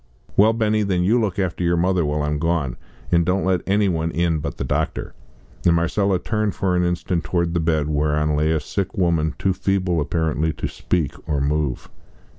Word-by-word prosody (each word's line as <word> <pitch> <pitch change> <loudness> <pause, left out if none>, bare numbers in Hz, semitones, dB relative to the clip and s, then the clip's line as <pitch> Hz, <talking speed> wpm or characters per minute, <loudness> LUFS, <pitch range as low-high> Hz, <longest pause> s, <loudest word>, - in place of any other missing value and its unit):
"Well, 110 +3 +5
Benny, 110 -1 +1
then 95 -3 +1
you 115 +6 +3
look 100 -5 -1
after 90 -3 -1
your 85 0 +2
mother 90 0 +2
while 75 0 -1
I'm 75 0 -1
gone, 80 -5 0 0.4
and 85 0 +4
don't 90 +3 0
let 95 -3 +2
any 100 +1 +3
one 80 -3 0
in 85 -1 0
but - - -5
the - - -3
doctor." 65 - -2 0.5
And 85 -1 +4
Marcella 95 +4 +1
turned 105 +2 -1
for 95 -2 0
an 90 - +2
instant 85 -1 -1
towards 85 -2 -1
the 85 - +1
bed 80 -2 +1
whereon 75 0 +1
lay 75 +1 +1
a 80 0 +2
sick 95 +7 -4
woman 80 -5 +1
too 95 +4 +1
feeble 95 -3 0
apparently 80 +1 0
to - - -4
speak 80 -7 -1 0.2
or 75 - +1
move. 70 -1 -1
85 Hz, 200 wpm, -22 LUFS, 75-95 Hz, 0.5 s, Well